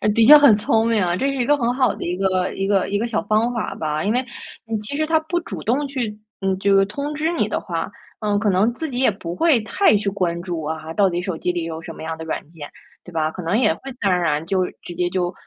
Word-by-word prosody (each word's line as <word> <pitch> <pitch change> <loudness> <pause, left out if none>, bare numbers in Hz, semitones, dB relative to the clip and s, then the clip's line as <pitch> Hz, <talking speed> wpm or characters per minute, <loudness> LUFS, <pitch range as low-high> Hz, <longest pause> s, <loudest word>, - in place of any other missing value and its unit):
的 225 - +5
确 300 +5 +11
很 285 -6 +7
聪 220 +2 +1
明 225 -2 +2
啊， 175 -1 +1
这 270 - 0
是 275 - -1
一 250 -2 0
个 295 - +4
很 240 -2 0
好 255 -5 +2
的 - - -6
一 175 +1 -2
个 185 -1 0
一 195 - -2
个 195 -2 +2
一 205 - 0
个 230 +3 -1
小 225 -2 -1
方 220 +3 +1
法 230 - -3
吧。 155 0 -2
因 205 - +1
为 250 +1 0 0.6
其 215 +7 -4
实 310 - +1
它 320 0 +2
不 345 +2 -1
主 - - -7
动 275 +6 0
去 240 -6 -3 0.2
嗯， 190 -1 0
这 200 +1 +2
个 195 0 +5
通 280 +8 -4
知 310 +2 -1
你 - - 0
的 - - -2
话， - - -4 0.3
嗯， 205 -1 +1
可 210 0 +1
能 200 +5 +2
自 315 +6 -4
己 250 -2 -3
也 260 -4 +4
不 175 -3 -6
会 320 - +3
太 370 - +3
去 200 0 -1
关 180 -4 -2
注 175 -3 -4
啊， 160 +1 -5
到 195 +1 +3
底 175 0 -2
手 180 -3 -4
机 180 - -1
里 175 -1 -3
有 165 -1 -5
什 165 0 -8
么 - - -11
样 160 0 -4
的 160 - -7
软 155 -2 -5
件， 160 -3 -10 0.3
对 180 - -12
吧？ 155 -2 0
可 180 - -7
能 170 +6 +1
也 230 -3 +3
会 270 - -9
自 250 - -13
然 - - +3
而 180 - +1
然 150 -1 0
就 185 0 +1 0.2
直 175 - -9
接 175 - 0
就， 180 0 -1
200 Hz, 305 characters per minute, -21 LUFS, 175-245 Hz, 0.6 s, 确